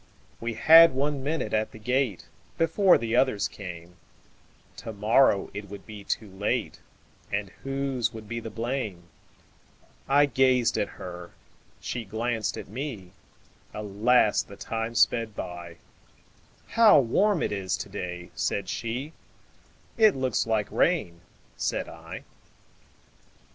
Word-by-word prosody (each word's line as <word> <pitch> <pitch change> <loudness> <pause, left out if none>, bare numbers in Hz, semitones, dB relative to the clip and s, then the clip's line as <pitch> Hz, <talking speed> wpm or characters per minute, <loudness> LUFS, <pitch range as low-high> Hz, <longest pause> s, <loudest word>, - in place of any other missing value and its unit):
We 115 0 -3
had 165 +5 +8
one 140 +1 -1
minute 155 +3 -2
at 110 0 0
the - - -10
gate, 125 -2 -1 0.3
Before 175 +4 +4
the 115 0 -2
others 115 -6 +2
came; 90 -3 -10 0.8
To 115 - -7
morrow 110 +1 +3
it 100 0 -7
would 100 -1 -10
be 105 -2 -10
too 105 0 -3
late, 100 +2 -2 0.5
And 100 -1 -2
whose 135 -4 -1
would 110 -1 -10
be 115 +2 -4
the 115 - -7
blame!I 115 +4 -3
gazed 130 -3 +2
at - - 0
her, 90 -1 -8 0.5
she 120 - -4
glanced 110 +1 -2
at - - -7
me; 110 -5 -6 0.6
Alas! 105 +2 +2
the 100 - -12
time 115 +2 -4
sped 115 -1 +2
by:"How 90 - -1
warm 185 - +2
it - - -1
is 95 -1 -2
to 100 - -6
day!" 90 -3 -6
said 100 -2 -2
she;"It 150 - -3
looks 130 -4 0
like 110 -2 0
rain," 90 - +1 0.4
said - - -2
I. - - -9
115 Hz, 120 wpm, -27 LUFS, 100-135 Hz, 0.8 s, had